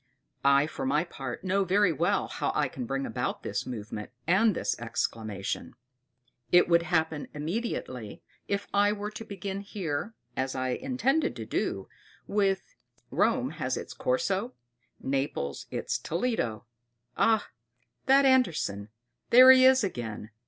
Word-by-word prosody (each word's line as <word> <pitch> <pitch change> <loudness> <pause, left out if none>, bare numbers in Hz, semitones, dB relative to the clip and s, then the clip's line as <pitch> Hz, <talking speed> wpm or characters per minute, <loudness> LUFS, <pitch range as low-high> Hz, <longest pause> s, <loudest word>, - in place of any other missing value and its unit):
I, 140 +1 +5
for 155 - -6
my 145 +4 +2
part, 135 -7 -7
know 195 +1 +1
very 190 -1 +3
well 140 - +1
how - - -2
I - - +2
can 125 -3 -6
bring 135 +1 -2
about - - -3
this - - -3
movement 110 -3 -6 0.2
and 195 +4 +4
this - - -1
exclamation. 110 -3 -3 0.8
It 180 - +6
would 170 -1 +4
happen 160 -3 0
immediately 150 - -4 0.2
if 200 0 -1
I 205 +1 +4
were 210 0 -5
to 220 - -7
begin 195 -1 -5
here, 195 0 -4 0.2
as 130 0 -2
I 130 0 -1
intended 265 - 0
to - - -6
do, - - -2 0.4
with: 200 - 0 0.4
"Rome - - +1
has - - -2
its - - -6
Corso, 255 - -1 0.4
Naples 135 - -2
its - - -2
Toledo" 165 - -2 0.5
"Ah! 220 -2 +2 0.6
that 275 +1 +6
Andersen; 165 - +2 0.4
there 255 +2 +10
he 260 0 +7
is 260 -2 +6
again!" 115 - -4
175 Hz, 140 wpm, -28 LUFS, 130-215 Hz, 0.8 s, there